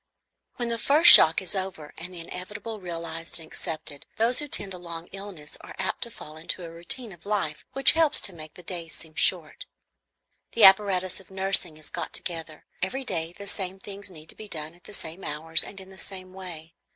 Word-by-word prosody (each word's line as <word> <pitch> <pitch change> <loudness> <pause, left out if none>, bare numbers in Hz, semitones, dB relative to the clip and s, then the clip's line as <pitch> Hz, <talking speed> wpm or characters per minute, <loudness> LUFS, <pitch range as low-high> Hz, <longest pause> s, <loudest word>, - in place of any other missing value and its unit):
When 240 -1 -2
the 230 0 -1
first 310 +7 +8
shock 165 +4 +8
is 180 - 0
over 190 -6 -4
and 175 +3 -5
the 175 -2 -8
inevitable 205 +6 -6
realized 165 -2 -5
and 165 - -9
accepted, 155 -3 -6
those 235 +3 +3
who 295 - -1
tend 200 -8 -1
a 180 - -7
long 170 -1 -7
illness 195 -6 -8
are - - -11
apt 190 - -2
to 240 - 0
fall 155 -8 -11
into 165 +3 -4
a 165 - -7
routine 175 +8 -1
of 175 -3 -14
life 200 -8 -2
which 270 - +7
helps 320 -2 +3
to 195 - -2
make 155 -2 -9
the 180 - -11
days 170 -2 -3
seem 160 -1 -9
short. - - 0 0.9
The 230 - +3
apparatus 190 -2 +6
of 195 - -17
nursing 190 -4 +3
is 155 - -11
got - - -4
together. 165 -3 -5 0.2
Every 260 +9 -1
day 165 -4 -3
the 200 - -8
same 190 -2 -1
things 200 +1 -9
need 160 -3 -14
to - - -8
be 215 - -10
done 155 -4 -5
at 175 - -19
the 210 - -11
same 170 +2 -2
hours 160 +2 +2
and 195 - -6
in 190 0 -12
the 190 - -11
same 185 -1 -6
way. 170 -4 -8
185 Hz, 210 wpm, -27 LUFS, 165-200 Hz, 0.9 s, first